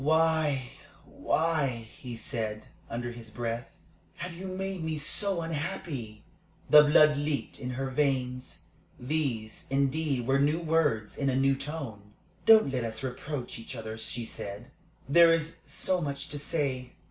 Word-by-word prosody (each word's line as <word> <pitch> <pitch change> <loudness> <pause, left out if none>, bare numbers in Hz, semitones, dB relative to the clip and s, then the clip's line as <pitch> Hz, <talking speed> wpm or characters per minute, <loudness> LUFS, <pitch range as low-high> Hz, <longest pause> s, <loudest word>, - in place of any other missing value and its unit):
"Why 155 -4 +2 0.3
why" 160 -3 +1 0.3
he 125 -2 -7
said, 110 -2 -3 0.2
under 120 +1 -3
his 120 -2 -10
breath 115 +1 -3 0.5
"have 180 - -5
you 185 +3 -7
made 190 -1 -3
me 160 -1 -2
so 180 +5 +1
unhappy?" 150 - -4 0.4
The 150 - +10
blood 150 0 +6
leaped 145 0 -2
in 125 - -4
her 135 0 -2
veins. 130 -3 -1 0.4
These, 125 -5 -2
indeed, 140 -1 +1
were 135 +2 +3
new 150 +4 +3
words 155 -10 +1
in 140 -1 +1
a 130 - +1
new 135 +1 +3
tone. 130 -9 -7 0.3
"Don't 220 -11 +8
let 125 -2 0
us 110 0 -4
reproach 130 -1 -4
each 115 +3 -8
other," 110 -1 -5
she 115 +1 -4
said. 105 +4 -7 0.4
"There 170 +4 +7
is 165 0 +1
so 185 -1 +1
much 140 -2 -3
to 145 - -4
say. 135 -4 -2
140 Hz, 145 wpm, -29 LUFS, 120-160 Hz, 0.5 s, The